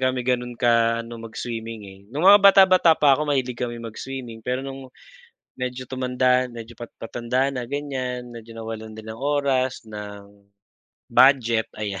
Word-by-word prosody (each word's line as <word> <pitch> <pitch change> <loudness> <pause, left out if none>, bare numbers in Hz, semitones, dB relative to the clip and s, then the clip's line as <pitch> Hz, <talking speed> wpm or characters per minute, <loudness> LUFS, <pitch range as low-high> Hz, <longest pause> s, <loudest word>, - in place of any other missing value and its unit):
kami 130 -1 0
gano'n 125 -1 -1
ka 115 -1 +2
ano 115 0 -9
mag-swimming, 115 0 -6
eh. 95 -1 -13
Nung 145 +9 -3
mga 205 +1 +9
bata-bata 190 -4 +6
pa 145 -2 +5
ako 150 +2 0
mahilig 130 -3 0
kami 120 -1 -3
mag-swimming 115 +1 -7
pero 125 +4 -3
nung 135 -1 -8 0.7
medyo 125 0 -5
tumanda 125 0 +1
medyo 120 0 -10
pat 120 +1 -9
patanda 120 +3 -1
na 125 - -3
ganyan 130 -2 -4
medyo 115 0 -11
nawalan 110 -1 -7
din 110 0 -11
ng 110 - -6
oras, 135 -4 0
ng 100 -1 -10 0.6
budget 120 -4 +4
ayan 100 -3 -4
125 Hz, 155 wpm, -23 LUFS, 115-130 Hz, 0.7 s, mga